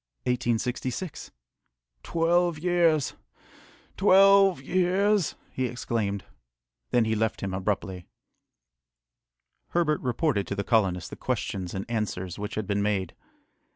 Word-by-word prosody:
"Twelve 170 Hz, -, +1 dB
years! 165 Hz, -3 st, +2 dB, 0.8 s
twelve 195 Hz, -1 st, +6 dB
years!" 185 Hz, +5 st, +1 dB, 0.2 s
he 130 Hz, -, -1 dB
exclaimed. 115 Hz, -5 st, -2 dB, 0.6 s
Then 120 Hz, -2 st, +3 dB
he 110 Hz, -, 0 dB
left 110 Hz, 0 st, -1 dB
him 95 Hz, -1 st, -3 dB
abruptly. 95 Hz, -2 st, -3 dB, 1.6 s
Herbert 160 Hz, -3 st, +1 dB
reported 125 Hz, -, 0 dB
to 100 Hz, -, -3 dB
the 100 Hz, -, -2 dB
colonists 95 Hz, -6 st, +1 dB
the -, -, -6 dB
questions 95 Hz, -2 st, -3 dB
and 95 Hz, -, -3 dB
answers 105 Hz, -5 st, -3 dB
which 105 Hz, +1 st, -5 dB
had 110 Hz, -, -2 dB
been 100 Hz, +1 st, 0 dB
made. 100 Hz, -3 st, -1 dB
115 Hz, 105 wpm, -27 LUFS, -, 1.6 s, twelve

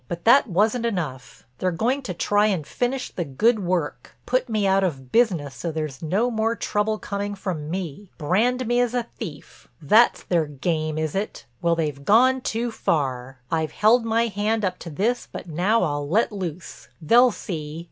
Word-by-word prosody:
But 170 Hz, 0 st, -6 dB
that 245 Hz, +4 st, +6 dB
wasn't 215 Hz, +5 st, +1 dB
enough—they're 140 Hz, -, -4 dB
going 230 Hz, +11 st, 0 dB
to 200 Hz, -9 st, -5 dB
try 205 Hz, +4 st, +2 dB
and 185 Hz, -8 st, -1 dB
finish 250 Hz, -, -2 dB
the 175 Hz, -, -3 dB
good 215 Hz, -, +2 dB
work—put 185 Hz, -, -2 dB
me 215 Hz, -2 st, 0 dB
out 195 Hz, 0 st, +3 dB
of 135 Hz, -8 st, -3 dB
business 175 Hz, -, +2 dB
so 170 Hz, -, -4 dB
there's 155 Hz, -4 st, -4 dB
no 200 Hz, +10 st, 0 dB
more 225 Hz, 0 st, 0 dB
trouble 215 Hz, -1 st, -1 dB
coming 205 Hz, 0 st, -4 dB
from 175 Hz, -6 st, -4 dB
me. 185 Hz, +1 st, -5 dB
Brand 230 Hz, +11 st, +1 dB
me 240 Hz, +1 st, +1 dB
as 245 Hz, 0 st, +1 dB
a 245 Hz, -, +1 dB, 0.2 s
thief—that's 185 Hz, +3 st, 0 dB
their 170 Hz, -4 st, +1 dB
game, 155 Hz, +2 st, -2 dB
is 155 Hz, -1 st, -2 dB
it? 200 Hz, +2 st, -4 dB, 0.2 s
Well—they've 160 Hz, -5 st, 0 dB
gone 255 Hz, -, +4 dB
too 235 Hz, 0 st, -2 dB
far. 130 Hz, -, -2 dB
I've 160 Hz, -2 st, -1 dB
held 225 Hz, +3 st, +4 dB
my 230 Hz, +1 st, +1 dB
hand 215 Hz, 0 st, 0 dB
up 185 Hz, -, -2 dB
to 170 Hz, -, -8 dB
this 220 Hz, +10 st, -1 dB
but -, -, -8 dB
now 180 Hz, +8 st, +1 dB
I'll 145 Hz, -3 st, -2 dB
let 220 Hz, +7 st, +2 dB
loose. 180 Hz, -4 st, -6 dB
They'll 235 Hz, +10 st, +5 dB
see! 160 Hz, -7 st, -6 dB
190 Hz, 170 wpm, -23 LUFS, 155-225 Hz, 0.2 s, that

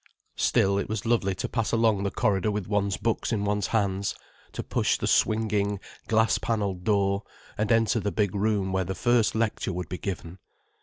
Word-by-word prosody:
Still, 100 Hz, +1 st, +2 dB
it -, -, -3 dB
was 110 Hz, 0 st, -3 dB
lovely 110 Hz, -5 st, +1 dB
to -, -, -3 dB
pass 115 Hz, -3 st, -1 dB
along 115 Hz, -3 st, +2 dB
the 100 Hz, -, 0 dB
corridor 100 Hz, 0 st, +1 dB
with 105 Hz, -2 st, -2 dB
one's 100 Hz, -1 st, 0 dB
books 115 Hz, +2 st, -1 dB
in 105 Hz, -3 st, 0 dB
one's 105 Hz, -1 st, 0 dB
hands, 100 Hz, -2 st, 0 dB, 0.4 s
to -, -, -4 dB
push -, -, +1 dB
the -, -, -3 dB
swinging, 105 Hz, -2 st, +1 dB, 0.3 s
glass 110 Hz, 0 st, +3 dB
panelled 100 Hz, -5 st, -2 dB
door, 100 Hz, -1 st, +2 dB, 0.3 s
and 105 Hz, 0 st, -1 dB
enter 115 Hz, 0 st, +3 dB
the 100 Hz, -1 st, -2 dB
big 100 Hz, -3 st, 0 dB
room 100 Hz, -2 st, 0 dB
where 95 Hz, 0 st, +1 dB
the 95 Hz, +2 st, -4 dB
first 120 Hz, +3 st, +2 dB
lecture 110 Hz, -3 st, 0 dB
would 90 Hz, -2 st, -5 dB
be 90 Hz, -, -5 dB
given. 90 Hz, -2 st, -5 dB
105 Hz, 190 wpm, -27 LUFS, 95-110 Hz, 0.4 s, glass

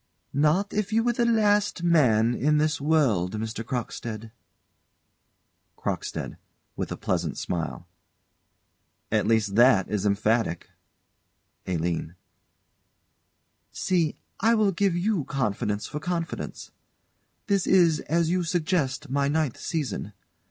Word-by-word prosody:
_] -, -, -48 dB, 0.3 s
Not 155 Hz, +8 st, +2 dB
if 210 Hz, 0 st, -1 dB
you 225 Hz, +1 st, +2 dB
were 240 Hz, 0 st, +2 dB
the 235 Hz, 0 st, +1 dB
last 205 Hz, -5 st, +2 dB
man 120 Hz, -9 st, +4 dB
in 150 Hz, +5 st, +2 dB
this 150 Hz, -1 st, +1 dB
world, 130 Hz, -, +2 dB
Mr. 110 Hz, +1 st, -4 dB
Crockstead. 115 Hz, -2 st, -5 dB, 1.5 s
CROCKSTEAD. -, -, -4 dB, 0.4 s
[With -, -, -4 dB
a -, -, -4 dB
pleasant -, -, -2 dB
smile.] 85 Hz, 0 st, -4 dB, 1.2 s
At -, -, +2 dB
least 110 Hz, -3 st, +2 dB
that 120 Hz, -6 st, +5 dB
is 105 Hz, -2 st, -1 dB
emphatic. 105 Hz, -3 st, 0 dB, 1.0 s
ALINE. 85 Hz, -1 st, -2 dB, 1.6 s
See, 170 Hz, -5 st, 0 dB, 0.2 s
I 230 Hz, +1 st, +4 dB
will 215 Hz, -3 st, +3 dB
give 190 Hz, 0 st, +1 dB
you 185 Hz, -2 st, 0 dB
confidence 105 Hz, -5 st, -2 dB
for 150 Hz, -, -5 dB
confidence. 170 Hz, +1 st, -4 dB, 0.7 s
This 200 Hz, -3 st, +1 dB
is, 170 Hz, -5 st, +4 dB
as 165 Hz, +1 st, +2 dB
you 180 Hz, 0 st, +1 dB
suggest, 160 Hz, -5 st, -1 dB
my 140 Hz, 0 st, +1 dB
ninth 150 Hz, -3 st, 0 dB
season. 135 Hz, -, -3 dB
150 Hz, 115 wpm, -26 LUFS, 110-180 Hz, 1.6 s, that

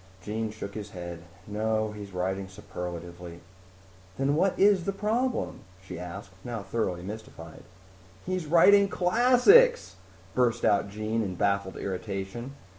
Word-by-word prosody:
Jean 110 Hz, +3 st, -3 dB
shook 105 Hz, -2 st, -7 dB
his 105 Hz, -1 st, -6 dB
head. 85 Hz, -3 st, -7 dB, 0.3 s
"No, 110 Hz, +1 st, -1 dB
he's 105 Hz, -1 st, -9 dB
writing 95 Hz, +1 st, -2 dB
superlatively." 90 Hz, -3 st, -8 dB, 0.8 s
"Then 135 Hz, +1 st, +1 dB
what 185 Hz, +4 st, +2 dB
is 195 Hz, -3 st, +4 dB
the 195 Hz, -, 0 dB
problem?" 230 Hz, +6 st, -1 dB, 0.2 s
she 95 Hz, -2 st, -9 dB
asked, 95 Hz, +3 st, -8 dB
now 115 Hz, -4 st, -5 dB
thoroughly 95 Hz, -4 st, -2 dB
mystified. 95 Hz, -5 st, -9 dB, 0.6 s
"He's 185 Hz, -3 st, -2 dB
writing 200 Hz, +5 st, +6 dB
classics!" 250 Hz, -, +5 dB, 0.4 s
burst 120 Hz, -2 st, +1 dB
out 100 Hz, -1 st, +3 dB
Jean 110 Hz, +2 st, -2 dB
in 95 Hz, -4 st, -3 dB
baffled 100 Hz, 0 st, 0 dB
irritation. 100 Hz, +6 st, -5 dB
105 Hz, 125 wpm, -28 LUFS, -, 0.8 s, writing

